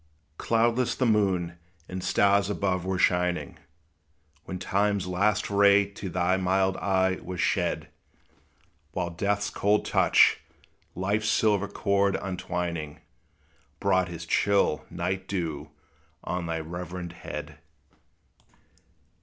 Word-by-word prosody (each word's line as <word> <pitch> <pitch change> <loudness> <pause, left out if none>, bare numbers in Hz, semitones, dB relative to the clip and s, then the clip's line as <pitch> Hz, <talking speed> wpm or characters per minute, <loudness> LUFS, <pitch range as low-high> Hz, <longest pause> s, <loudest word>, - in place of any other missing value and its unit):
Cloudless 120 +1 +1
the 130 - 0
moon 95 -6 +1 0.3
and 95 0 -6
stars 100 0 +3
above 95 -3 -1
were 95 0 -1
shining, 90 0 0 0.9
When 95 - -5
time's 100 +1 0
last 100 +3 +1
ray 100 0 +5
to 100 -1 -6
thy 90 +1 +1
mild 95 +1 +1
eye 95 -1 +1
was 90 -1 -6
shed; - - 0 1.1
While 85 - -2
death's 100 +4 -1
cold 105 +1 +1
touch, - - +4 0.6
life's 105 +4 0
silver 105 -2 +2
cord 100 -1 +1
untwining, 90 -5 -4 0.8
Brought 95 -2 +2
his 85 -1 -7
chill 100 -4 +2
night 90 +2 -3
dew 80 -6 -3 0.5
on 90 0 -3
thy 80 -1 -2
reverend 85 +1 -6
head. 75 -3 -8
95 Hz, 110 wpm, -27 LUFS, 90-100 Hz, 1.1 s, ray